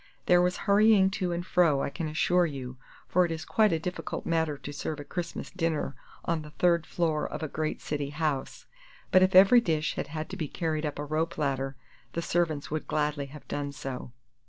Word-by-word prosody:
There 175 0 +5
was 180 +1 +1
hurrying 200 -1 +5
to 185 -3 -1
and 175 +1 -3
fro, 165 -7 +3
I - - -2
can 165 0 -3
assure 175 +3 +2
you, 130 -4 -6 0.3
for 180 - +3
it 170 - -1
is 160 -2 -4
quite 215 -1 +3
a 165 - +2
difficult 180 +3 -5
matter 160 -3 0
to 145 - -8
serve 150 +1 -4
a - - -5
Christmas 170 +2 -5
dinner 165 -6 -1 0.3
on 165 -1 0
the 150 - -10
third 170 +1 +2
floor 160 -3 0
of - - -6
a - - -1
great 155 +1 -3
city 145 -2 -3
house; 150 -2 -2 0.5
but 185 - +6
if 185 0 +3
every 200 +6 +8
dish 155 -6 0
had - - -4
had 155 +1 -5
to 190 - -5
be 160 -5 -2
carried 155 0 -2
up 145 - -5
a 145 - -3
rope 160 +3 -1
ladder 135 -2 -1 0.4
the 170 - -2
servants 160 -5 0
would 155 0 -3
gladly 150 -2 -1
have 150 +1 -12
done 145 -1 -3
so. 135 -3 -6
160 Hz, 210 wpm, -28 LUFS, 145-175 Hz, 0.5 s, every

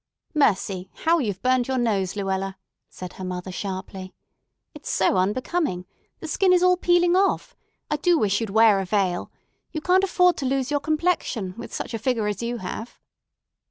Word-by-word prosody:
"Mercy, 195 - +1 0.2
how 335 +1 +4
you've 205 -9 -3
burned 255 -1 +2
your 265 -1 -1
nose, 205 -6 0
Luella!" 195 -1 -2 0.3
said 180 -1 -9
her 190 - -9
mother 185 0 -5
sharply. 190 0 -6 0.6
"It's 300 - -9
so 190 - +2
unbecoming. 210 - -1 0.4
The 320 - -6
skin 370 +4 +2
is 360 0 +4
all 365 0 +5
peeling 350 0 +3
off. 395 +6 +1 0.4
I 300 - +1
do 345 +3 +3
wish 205 -5 +1
you'd 225 - -2
wear 220 -1 +5
a 195 - -2
veil. 185 -2 -1 0.4
You 315 - -3
can't 370 +4 +3
afford 360 -2 +3
to 275 - -3
lose 270 +1 -1
your 290 - +2
complexion, 305 - -1
with - - -9
such - - -5
a 225 - -2
figure 230 -1 0
as 210 0 -2
you 235 +1 -2
have." 220 +3 -7
230 Hz, 180 wpm, -24 LUFS, 195-315 Hz, 0.6 s, all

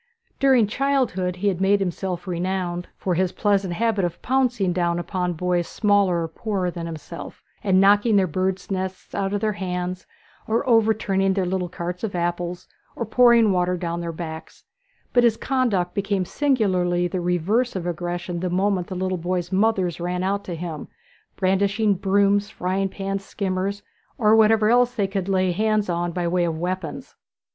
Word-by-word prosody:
During 265 -5 +5
childhood 220 -7 0
he 195 +3 -2
had 190 -2 0
made 200 +1 +4
himself 180 -1 -3
renowned 180 0 -2
for 185 - -1
his 180 +1 +1
pleasant 195 -4 0
habit 225 -1 +1
of 175 -1 -2
pouncing 245 -8 +1
down 175 -1 0
upon 180 0 -2
boys 175 +1 0
smaller 200 -5 +2
and 165 0 -6
poorer 195 -4 -2
than 170 -1 -5
himself, 165 +1 -8 0.2
and 190 -2 +3
knocking 205 +3 +5
their 195 -2 +4
birds' 185 +3 -2
nests 190 -1 -4
out 195 -1 -1
of 205 0 -1
their 215 - +1
hands, 180 -1 -4 0.4
or 225 +2 0
overturning 215 -4 +2
their 190 -2 +1
little 180 0 -2
carts 175 +2 -5
of 205 -4 -3
apples, 175 0 -2 0.3
or - - -3
pouring 235 -1 +5
water 180 0 +1
down 170 -1 -3
their 170 -1 -3
backs; 160 -1 -8 0.5
but 245 - +5
his 230 -2 +3
conduct 225 -11 0
became 200 -2 -1
singularly 185 -10 +1
the 180 +1 -3
reverse 180 +8 0
of 180 -2 -3
aggressive 175 0 -3
the 180 +1 -2
moment 185 0 0
the 190 - -6
little 185 0 -2
boys' 175 +1 -2
mothers 190 -4 +1
ran 180 +1 -2
out 200 +1 -1
to 175 - -5
him, 165 -2 -6 0.5
brandishing 200 +2 +2
brooms, 200 +2 +2
frying 195 0 -1
pans, 195 0 -4
skimmers, 195 0 -3 0.3
and 215 -1 +4
whatever 220 -1 +5
else 245 0 +3
they 205 - +1
could 195 -1 -3
lay 185 -1 +2
hands 215 +2 +1
on 175 0 -1
by 175 0 -2
way 175 +1 +1
of 165 -2 -1
weapons. 175 -1 -4
190 Hz, 170 wpm, -23 LUFS, 175-205 Hz, 0.5 s, During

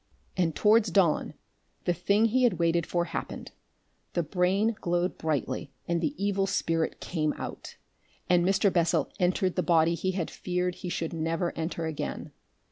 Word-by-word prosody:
And 170 -4 +1
towards 215 0 +4
dawn 175 -3 +2 0.5
the 175 - +2
thing 200 +6 +2
he 245 +3 +2
had 245 -5 +4
waited 170 -1 +1
for 175 -1 0
happened, 165 -2 -6 0.6
the 175 - +1
brain 190 +7 +1
glowed 175 +1 0
brightly 140 -3 -2 0.2
and 170 -1 0
the 290 - -1
evil 200 -1 0
spirit 165 -4 0
came 155 -4 -1
out, - - -7 0.5
and 175 -1 +4
Mr. 195 +1 +3
Bessel 170 -2 +2
entered 185 0 +1
the 180 - +2
body 165 -1 +3
he 185 +3 -1
had 180 -4 -3
feared 180 0 -2
he 180 0 -6
should 165 -1 -3
never 165 +1 -1
enter 165 0 -3
again. 160 -2 -4
175 Hz, 160 wpm, -28 LUFS, 165-190 Hz, 0.6 s, towards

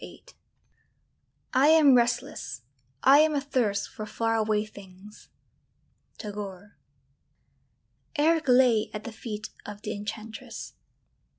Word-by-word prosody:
VIII - - -12 1.3
I 265 +2 +5
am 310 -3 +7
restless, 240 - 0 0.4
I 275 +2 +7
am 310 0 +4
athirst 255 -8 0
for 215 -4 -8
far 225 +1 -1
away 215 -1 +1
things. 200 0 -14 0.9
TAGORE. 205 -2 -8 1.4
Eric 315 +1 +2
lay 250 -4 +4
at 210 - -5
the 235 - -6
feet 215 -1 -7
of 210 0 -9
the 215 - -3
enchantress. 215 +2 -7
220 Hz, 105 wpm, -27 LUFS, 210-265 Hz, 1.4 s, am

